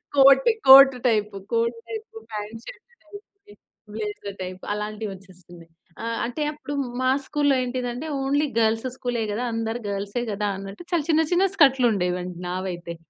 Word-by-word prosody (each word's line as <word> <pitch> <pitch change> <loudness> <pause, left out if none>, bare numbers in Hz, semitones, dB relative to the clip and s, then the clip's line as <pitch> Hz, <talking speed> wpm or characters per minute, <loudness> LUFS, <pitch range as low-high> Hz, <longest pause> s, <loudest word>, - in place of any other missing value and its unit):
Coat, 270 -1 +6 0.2
coat 270 0 +10
type. 215 -2 +1 0.2
Coat 230 0 +1
type, 445 -1 -6 0.2
pant 215 +2 -6
shirt - - -11 0.2
type 405 +6 -12 0.7
blazer 210 -2 -5
type 185 0 -6
అలాంటివి 210 +1 -4
వచ్చేస్తున్నాయి. 180 -3 -15 0.3
ఆహ్ 230 0 -2
అంటే 245 +6 -5
అప్పుడు 295 -1 -8 0.3
మా 255 - +2 0.2
స్కూల్లో 285 -2 +1
ఏంటిదంటే 250 +3 -4 0.2
ఓన్లీ 285 +2 +1
గర్ల్స్ 225 +2 +1
స్కూలే 245 -3 -2
కదా! 230 +4 -2
అందరూ 225 +1 -2
గర్ల్సే 200 +4 -3
కదా! 205 +1 -2
అన్నట్టు 195 - -9
చాలా 340 -4 +1
చిన్న, 320 0 +4
చిన్న 360 +2 +4
స్కర్ట్‌‌లుండేవండి 195 - +2
నావైతే. 180 -2 -5
230 Hz, 140 wpm, -24 LUFS, 200-270 Hz, 0.7 s, Coat